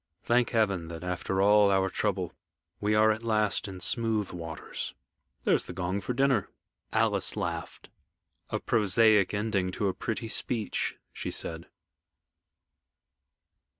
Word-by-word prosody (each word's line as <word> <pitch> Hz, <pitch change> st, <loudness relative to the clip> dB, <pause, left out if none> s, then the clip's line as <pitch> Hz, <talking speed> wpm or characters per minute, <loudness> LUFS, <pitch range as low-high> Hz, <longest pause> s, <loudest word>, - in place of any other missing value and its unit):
Thank 120 Hz, 0 st, +2 dB
Heaven 100 Hz, -7 st, +1 dB
that, 85 Hz, 0 st, -7 dB
after 90 Hz, +2 st, -1 dB
all 105 Hz, 0 st, +6 dB
our 95 Hz, -1 st, +3 dB
trouble, 95 Hz, -5 st, -1 dB, 0.5 s
we 105 Hz, +1 st, +1 dB
are 110 Hz, +1 st, +5 dB
at 110 Hz, +1 st, -2 dB
last 110 Hz, -2 st, +1 dB
in 95 Hz, -1 st, -7 dB
smooth 110 Hz, -1 st, +1 dB
waters. 80 Hz, -3 st, -5 dB, 0.5 s
There's -, -, +2 dB
the -, -, -7 dB
gong 95 Hz, +2 st, -2 dB
for 125 Hz, +5 st, -3 dB
dinner." 135 Hz, -6 st, +2 dB, 0.4 s
Alice -, -, +1 dB
laughed. -, -, -4 dB, 0.6 s
"A -, -, -1 dB
prosaic 110 Hz, -2 st, +4 dB
ending 100 Hz, -3 st, 0 dB
to 100 Hz, 0 st, 0 dB
a -, -, -1 dB
pretty 115 Hz, +3 st, -3 dB
speech," 110 Hz, -1 st, -1 dB, 0.2 s
she -, -, -4 dB
said. 85 Hz, +1 st, -4 dB
105 Hz, 130 wpm, -29 LUFS, 95-110 Hz, 0.6 s, all